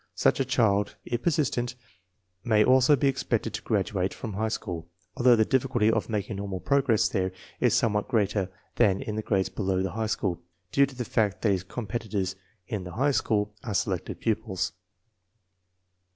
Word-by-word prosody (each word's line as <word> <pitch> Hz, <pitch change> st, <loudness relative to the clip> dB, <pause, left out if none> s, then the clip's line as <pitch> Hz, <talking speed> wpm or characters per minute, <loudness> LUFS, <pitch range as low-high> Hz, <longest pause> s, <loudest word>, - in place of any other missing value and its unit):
Such -, -, +2 dB
a 135 Hz, -, +2 dB
child, 110 Hz, -6 st, +2 dB
if 120 Hz, 0 st, -2 dB
persistent, 125 Hz, -7 st, 0 dB, 0.7 s
may 110 Hz, -3 st, +4 dB
also 130 Hz, +3 st, +6 dB
be 140 Hz, +1 st, +1 dB
expected 115 Hz, -5 st, -1 dB
to -, -, -4 dB
graduate 95 Hz, -3 st, -1 dB
from' 110 Hz, -3 st, -6 dB
high 110 Hz, +3 st, -1 dB
school, 90 Hz, -7 st, -4 dB, 0.3 s
although 125 Hz, -1 st, +5 dB
the 110 Hz, -1 st, +3 dB
difficulty 125 Hz, -4 st, +2 dB
of 110 Hz, 0 st, -1 dB
making 105 Hz, -1 st, -2 dB
normal 100 Hz, -2 st, -4 dB
progress 130 Hz, +3 st, +2 dB
there 95 Hz, -1 st, -1 dB, 0.3 s
is 120 Hz, -2 st, +3 dB
somewhat 105 Hz, -4 st, +1 dB
greater 105 Hz, -5 st, +1 dB, 0.3 s
than 95 Hz, -2 st, +4 dB
in 105 Hz, -, -4 dB
the 110 Hz, -, -1 dB
grades 95 Hz, -3 st, 0 dB
below 95 Hz, -1 st, -1 dB
the 95 Hz, -, -2 dB
high 110 Hz, 0 st, -2 dB
school, 90 Hz, -5 st, -1 dB, 0.3 s
due 140 Hz, 0 st, +4 dB
to 135 Hz, -, -12 dB
the 125 Hz, -1 st, -3 dB
fact 105 Hz, -4 st, 0 dB
that 110 Hz, -, +4 dB
his. 95 Hz, -2 st, +1 dB
competitors 105 Hz, -2 st, -3 dB, 0.3 s
in 105 Hz, -4 st, -3 dB
the 90 Hz, -1 st, -8 dB
high 140 Hz, +5 st, +2 dB
school 105 Hz, -5 st, 0 dB
are 110 Hz, -6 st, -3 dB
selected -, -, -1 dB
pupils. 95 Hz, -5 st, -1 dB
110 Hz, 175 wpm, -27 LUFS, 100-120 Hz, 0.7 s, also